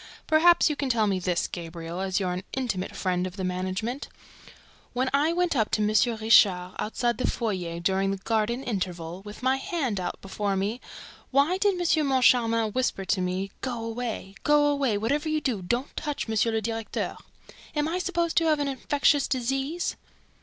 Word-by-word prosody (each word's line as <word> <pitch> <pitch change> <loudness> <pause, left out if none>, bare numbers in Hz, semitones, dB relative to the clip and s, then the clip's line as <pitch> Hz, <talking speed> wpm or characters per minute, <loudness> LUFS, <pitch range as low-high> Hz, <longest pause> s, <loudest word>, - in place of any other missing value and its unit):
"Perhaps 340 +2 +5
you 300 - 0
can 280 -2 -2
tell 230 -3 +3
me 195 -2 +1
this, 180 -1 0
Gabriel, 170 0 -6
as 190 0 0
you're 185 -2 -1
an 180 - -3
intimate 235 -8 -2
friend 180 -1 0
of 180 - -9
the 190 - -4
management: 185 +8 -3 0.8
When 260 +1 0
I 295 +4 +3
went 350 -2 +1
up 220 -4 +2
to - - -1
M. 210 - +2
Richard, 215 -5 +4
outside 240 +3 -1
the - - +1
foyer, 180 -7 -2
during 190 +2 +1
the 195 - -1
Garden 225 +5 -1
interval, 180 -6 -3
with 210 +4 -10
my 260 +1 +3
hand 270 - -2
out 180 -1 -4
before 195 +1 -2
me, 205 +6 -2 0.5
why 285 +8 +2
did 405 -1 +3
M. 320 -4 +2
Moncharmin 250 -3 +4
hurriedly 220 -1 -1
whisper 250 -5 -1
to 185 +1 +1
me, 185 +2 -2
'Go 240 -3 -3
away! 230 -4 -4
Go 295 0 +4
away! 280 -7 +1
Whatever 285 +9 0
you 310 0 +1
do, 250 -9 -1
don't 240 +9 -2
touch 295 -5 -3
M. 220 - -2 0.2
le 220 0 0
Directeur!' 225 0 -3 0.6
Am 295 0 +1
I 350 +3 -1
supposed 345 -2 -1
to 330 - +4
have 310 -1 +3
an 290 -1 -1
infectious 280 +1 +2
disease?" 270 +6 -1
230 Hz, 185 wpm, -26 LUFS, 190-280 Hz, 0.8 s, Perhaps